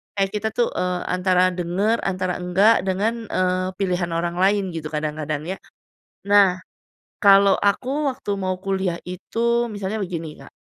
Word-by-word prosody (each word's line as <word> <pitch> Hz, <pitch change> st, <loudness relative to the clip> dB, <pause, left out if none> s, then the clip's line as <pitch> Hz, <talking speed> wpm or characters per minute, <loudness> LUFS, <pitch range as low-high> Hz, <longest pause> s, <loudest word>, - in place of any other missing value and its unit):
kayak 195 Hz, -1 st, +1 dB
kita 210 Hz, +1 st, -1 dB
tuh, 240 Hz, -, +2 dB
eee, 180 Hz, 0 st, -1 dB
antara 185 Hz, 0 st, +2 dB
dengar 185 Hz, +6 st, 0 dB
antara 185 Hz, -1 st, -1 dB
enggak, 190 Hz, +5 st, +4 dB
eee, 190 Hz, -, -8 dB
dengan, 205 Hz, +5 st, 0 dB, 0.2 s
eee, 185 Hz, 0 st, +1 dB
pilihan 180 Hz, -2 st, -1 dB
orang 170 Hz, +1 st, -2 dB
lain 195 Hz, +1 st, +2 dB
gitu 155 Hz, -2 st, -4 dB
kadang-kadang 150 Hz, -1 st, -3 dB
ya. 190 Hz, -, -3 dB, 0.7 s
Nah, 200 Hz, -3 st, +5 dB, 0.7 s
kalau 200 Hz, -1 st, +6 dB
aku 270 Hz, +8 st, 0 dB
waktu 255 Hz, -5 st, -7 dB
mau 185 Hz, -1 st, -2 dB
kuliah 190 Hz, -3 st, -1 dB
itu, 235 Hz, +6 st, -1 dB
misalnya 205 Hz, +1 st, -4 dB
begini 165 Hz, -4 st, -5 dB
Kak, -, -, -15 dB
190 Hz, 150 wpm, -22 LUFS, 180-205 Hz, 0.7 s, kalau